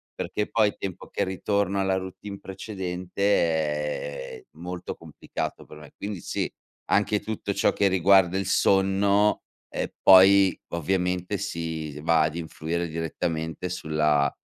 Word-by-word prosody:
Perché 105 Hz, -, -3 dB
poi 110 Hz, -2 st, +2 dB
tempo 95 Hz, -3 st, -6 dB
che -, -, -1 dB
ritorno 100 Hz, +1 st, 0 dB
alla 95 Hz, -1 st, +1 dB
routine 95 Hz, +2 st, -6 dB
precedente 95 Hz, -2 st, -6 dB, 1.2 s
è -, -, -28 dB
molto 90 Hz, 0 st, -6 dB
complicato -, -, -6 dB
per 75 Hz, -, -13 dB
me, 75 Hz, -1 st, -13 dB
quindi 100 Hz, -2 st, -5 dB
sì, -, -, -2 dB, 0.4 s
anche 105 Hz, 0 st, +2 dB
tutto 110 Hz, -2 st, -3 dB
ciò 100 Hz, -, +2 dB
che 100 Hz, -, +2 dB
riguarda 95 Hz, 0 st, +4 dB
il 95 Hz, -, -1 dB
sonno, 100 Hz, +2 st, +3 dB, 0.3 s
e -, -, -3 dB
poi 95 Hz, 0 st, +7 dB
ovviamente 90 Hz, +3 st, -1 dB
si 80 Hz, -6 st, -4 dB
va 80 Hz, 0 st, +3 dB
ad 80 Hz, +1 st, -1 dB
influire 85 Hz, +1 st, -3 dB
direttamente 80 Hz, +1 st, -3 dB
sulla 75 Hz, -4 st, +1 dB
95 Hz, 130 wpm, -26 LUFS, 85-100 Hz, 1.2 s, poi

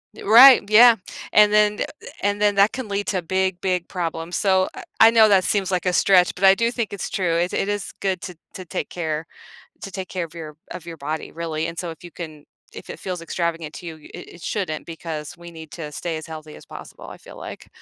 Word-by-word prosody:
I -, -, -12 dB
right, 235 Hz, 0 st, +8 dB
yeah. 230 Hz, +2 st, +8 dB, 0.4 s
And 210 Hz, 0 st, +6 dB
then 210 Hz, 0 st, +3 dB
eh, -, -, +1 dB, 0.2 s
eh, -, -, -12 dB
and 205 Hz, +1 st, -1 dB
then 205 Hz, -1 st, +3 dB
that 200 Hz, +2 st, +4 dB
can 260 Hz, -4 st, -6 dB
lead 200 Hz, 0 st, -3 dB
to 185 Hz, -3 st, -1 dB
big, 190 Hz, +1 st, -1 dB
big 180 Hz, -2 st, -1 dB
problems, 170 Hz, -1 st, -4 dB
so 190 Hz, -2 st, +2 dB
I -, -, -9 dB, 0.2 s
I 225 Hz, -, +9 dB
know 225 Hz, -1 st, +6 dB
that 195 Hz, -3 st, +4 dB
seems 195 Hz, -2 st, 0 dB
like 185 Hz, -1 st, -1 dB
a 180 Hz, -, +2 dB
stretch, 180 Hz, 0 st, +4 dB
but 195 Hz, -, +1 dB
I 190 Hz, 0 st, +7 dB
do 230 Hz, +3 st, 0 dB
think 235 Hz, -5 st, -3 dB
it's 200 Hz, -, -4 dB
true; 180 Hz, -5 st, -1 dB
it 175 Hz, +2 st, 0 dB
it -, -, -1 dB
is 205 Hz, -1 st, -3 dB
good 190 Hz, -3 st, -2 dB
to 180 Hz, -, -7 dB, 0.2 s
to 185 Hz, -, -8 dB
take 165 Hz, -, -4 dB
care 160 Hz, -2 st, -3 dB, 0.6 s
to 195 Hz, -, -7 dB
take 190 Hz, 0 st, -6 dB
care 180 Hz, -2 st, -3 dB
of 160 Hz, -, -16 dB
your 155 Hz, -3 st, -9 dB
of 170 Hz, -, -8 dB
your 165 Hz, -1 st, -8 dB
body, 155 Hz, +2 st, -5 dB
really, 160 Hz, -1 st, -3 dB
and 165 Hz, 0 st, -8 dB
so 175 Hz, -, -4 dB
if 160 Hz, -, -13 dB
you 175 Hz, -, -10 dB
can 155 Hz, -4 st, -9 dB, 0.3 s
if -, -, -11 dB
it -, -, -8 dB
feels 180 Hz, -2 st, -5 dB
extravagant 165 Hz, -2 st, -3 dB
to -, -, -9 dB
you, 165 Hz, -1 st, -7 dB, 0.2 s
it -, -, -9 dB
it 170 Hz, -, -16 dB
shouldn't 175 Hz, -8 st, -3 dB
because 160 Hz, -1 st, -7 dB
we 170 Hz, 0 st, -11 dB
need 160 Hz, -2 st, -11 dB
to 155 Hz, -3 st, -7 dB
stay 160 Hz, +2 st, -4 dB
as 155 Hz, -, -8 dB
healthy 155 Hz, -1 st, -9 dB
as -, -, -14 dB
possible, -, -, -11 dB
I -, -, -10 dB
feel -, -, -14 dB
like. -, -, -9 dB
180 Hz, 250 wpm, -22 LUFS, 165-200 Hz, 0.6 s, I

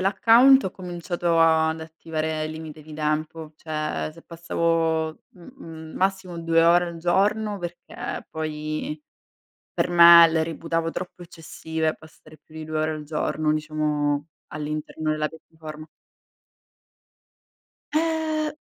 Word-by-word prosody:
l'account, 235 Hz, +7 st, +5 dB
ho 190 Hz, -, -2 dB
cominciato 175 Hz, -2 st, -2 dB
ad 160 Hz, 0 st, +3 dB
attivare 160 Hz, -1 st, -4 dB
il 155 Hz, -, -4 dB
limite 155 Hz, -1 st, -9 dB
di 155 Hz, 0 st, -12 dB
tempo. 155 Hz, +1 st, -3 dB
Cioè, 155 Hz, -1 st, -3 dB
se 165 Hz, +1 st, -16 dB
passavo 165 Hz, -1 st, 0 dB, 0.2 s
m 180 Hz, -, -18 dB, 0.2 s
m 160 Hz, -7 st, -10 dB
massimo 190 Hz, -2 st, -1 dB
2 165 Hz, 0 st, +3 dB
ore 175 Hz, +1 st, +5 dB
al 170 Hz, -1 st, -7 dB
giorno, 205 Hz, +4 st, +1 dB
perché 175 Hz, -1 st, -7 dB
poi, 155 Hz, -1 st, -4 dB, 0.8 s
per -, -, 0 dB
me 170 Hz, -1 st, +9 dB
le 160 Hz, 0 st, +1 dB
reputavo 165 Hz, +1 st, -2 dB
troppo 180 Hz, 0 st, -7 dB
eccessive, 160 Hz, -1 st, -4 dB
passare 155 Hz, 0 st, -17 dB
più -, -, -23 dB
di 155 Hz, -1 st, -7 dB
2 155 Hz, 0 st, -3 dB
ore 155 Hz, 0 st, 0 dB
al 155 Hz, -1 st, -5 dB
giorno, 155 Hz, 0 st, -1 dB
diciamo, 150 Hz, -1 st, -1 dB, 0.2 s
all'interno 150 Hz, +1 st, -4 dB
della 155 Hz, 0 st, -1 dB
piattaforma. 155 Hz, -1 st, -11 dB, 2.1 s
Eh 315 Hz, -1 st, 0 dB
160 Hz, 125 wpm, -24 LUFS, 155-175 Hz, 2.1 s, me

